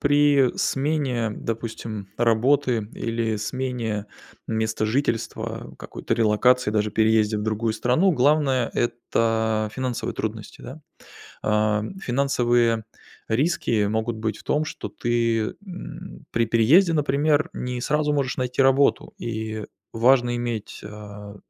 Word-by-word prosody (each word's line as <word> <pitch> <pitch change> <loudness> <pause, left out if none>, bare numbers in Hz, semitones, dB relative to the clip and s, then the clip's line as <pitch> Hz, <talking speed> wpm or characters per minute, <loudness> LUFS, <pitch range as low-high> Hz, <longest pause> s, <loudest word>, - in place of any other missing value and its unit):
при 145 -2 +4
смене, 135 -5 0
допустим, 110 -3 -5
работы 120 0 +2
или 115 -1 -2
смене 115 -2 -3 0.4
места 110 -1 -1
жительства, 115 0 -2
какой-то - - -5
релокации, 115 +2 +3
даже 105 0 0
переезде 110 0 +2
в - - -3
другую 110 +1 -1
страну 125 - +2
главное- 135 -3 +2
это 110 -2 0
финансовые 130 -2 -3
трудности. 110 -1 -5
Да? 140 +5 -9 0.6
А, 105 0 +2 0.2
финансовые 120 - +2 0.4
риски 115 -4 +1
могут 110 +2 -1
быть 110 -1 -2
в - - -15
том, 150 +1 0
что 145 - -6
ты, 115 -2 0
м, 175 - -9
при 115 0 +2
переезде, 140 - +5
например, 150 0 +2
не 125 0 -4
сразу 150 +2 +1
можешь 140 -3 -1
найти 125 +1 0
работу, 135 +1 +3
и 110 -1 -4 0.3
важно 120 +1 +3
иметь, 120 -3 -4
а, 105 -1 -9
115 Hz, 115 wpm, -24 LUFS, 110-135 Hz, 0.6 s, переезде